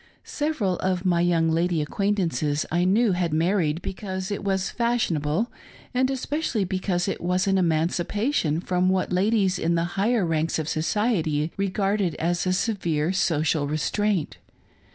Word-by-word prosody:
Several 265 - -1
of 185 0 -1
my 175 -2 +3
young 165 -2 +2
lady 170 +1 +1
acquaintances, 165 -3 0
I 175 +1 +2
knew, 210 +4 +3
had 175 -3 0
married 165 -1 +1
because 190 -1 -5
it 200 - -3
was 190 -1 -1
fashionable, 220 -6 0 0.4
and 255 +1 +2
especially 270 -3 -1
because 185 -1 -1
it 195 - -3
was 180 +2 +1
an 195 -1 +2
emancipation 170 - 0
from 180 0 +1
what 185 0 0
ladies 195 0 +2
in 170 +1 +1
the 165 - +1
higher 210 +1 +1
ranks 165 0 0
of 155 -2 -3
society 160 -3 0
regarded 195 -1 0
as 175 +2 -1
a 185 - +2
severe 180 -5 0
social 160 -5 +1
restraint. 180 +4 -1
185 Hz, 145 wpm, -25 LUFS, 165-200 Hz, 0.4 s, my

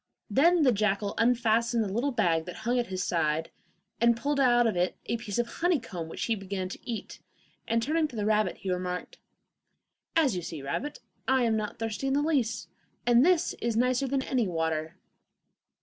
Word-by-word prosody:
Then 330 - +4
the 260 - +5
jackal 205 -1 0
unfastened 230 -1 +2
the 195 -2 -4
little 245 +6 +1
bag 170 -9 +1
that 180 - -7
hung 245 +1 +2
at 240 - -1
his 185 0 -3
side, 160 -2 0 0.5
and 235 0 +4
pulled 285 +3 -1
out 240 -2 +5
of 225 - +1
it 180 +1 0
a 235 - -1
piece 220 -4 -5
of 240 - +2
honeycomb 230 - -1
which - - -4
he 230 - +1
began 195 -2 -4
to - - -7
eat, 230 -2 -5 0.5
and 230 0 +1
turning 310 +4 +1
to 255 - -12
the 210 -2 -1
rabbit 215 -3 +1
he 190 - -4
remarked: 180 - -4 1.0
'As 295 - +3
you 180 - -2
see, 160 -4 -7
rabbit, 245 - -4 0.3
I 260 -1 +3
am 225 -2 +2
not 215 -1 -3
thirsty 225 +3 -3
in 270 - +1
the 290 +1 +2
least, 275 -8 0 0.4
and 240 +1 +5
this 350 0 +3
is 230 -1 0
nicer 250 +2 +2
than 265 0 0
any 250 -6 0
water. 160 -1 -2
230 Hz, 195 wpm, -28 LUFS, 190-255 Hz, 1.0 s, the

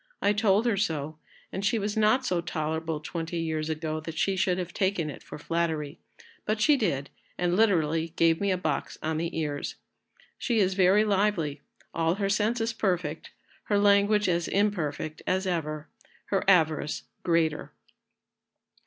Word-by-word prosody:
I 205 - +2
told 205 +1 +3
her 230 -4 +2
so, 155 -5 -2 0.3
and 195 - -4
she 205 +3 +2
was 205 0 -2
not 220 +5 +3
so 180 -6 0
tolerable 160 -1 -2
twenty 165 +1 -4
years 160 -1 -2
ago 155 0 -2
that 160 +1 -7
she 195 +3 +1
should 185 -1 +1
have 180 -1 -4
taken 185 -6 0
it - - -11
for - - -9
flattery, 160 -1 -2 0.4
but 215 +1 -1
she 290 +7 +5
did, 165 - -1 0.3
and 175 0 +1
literally 165 -6 +2
gave 165 +1 +3
me 200 - +1
a 185 - +2
box 180 - -2
on 160 0 -1
the 165 +1 -3
ears. 150 -3 -3 0.6
She 240 -3 0
is 190 -3 +3
very 190 +3 +4
lively, 190 -8 0 0.3
all 165 +1 +1
her 200 -1 -1
senses 225 +3 +1
perfect, 180 -8 -2 0.4
her 205 - +1
language 205 +1 +4
as 170 -1 +1
imperfect 160 -7 -1
as 190 +1 +1
ever, 155 -4 -2 0.4
her 195 - +1
avarice 160 -5 +3 0.2
greater." 165 -3 0
175 Hz, 160 wpm, -27 LUFS, 160-200 Hz, 0.6 s, she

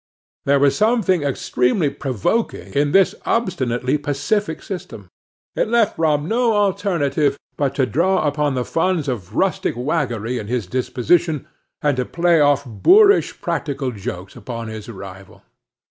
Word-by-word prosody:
There 140 0 +4
was 140 0 +3
something 215 -6 +2
extremely 140 +2 0
provoking 135 - -2
in 145 0 +1
this 195 +1 +4
obstinately 135 - 0
pacific 150 +5 -2
system; 110 - -8 0.5
it - - +1
left 230 -2 +2
Brom 155 -2 +1
no 235 +1 +2
alternative 170 -9 +1 0.2
but 140 -2 -1
to 135 - +2
draw 175 +7 +1
upon 145 -1 0
the 125 -1 -1
funds 165 -2 0
of 110 -5 -5
rustic 190 -9 0
waggery 125 -4 -2
in 105 - -7
his 120 -2 -2
disposition, 130 - 0 0.4
and 145 -3 +1
to 125 - 0
play 170 +2 +2
off 145 -1 +3
boorish 400 - +4
practical 140 -3 -2
jokes 95 -3 -7
upon 115 -3 -6
his 110 0 -8
rival. 95 -2 -11
145 Hz, 140 wpm, -20 LUFS, 125-175 Hz, 0.5 s, There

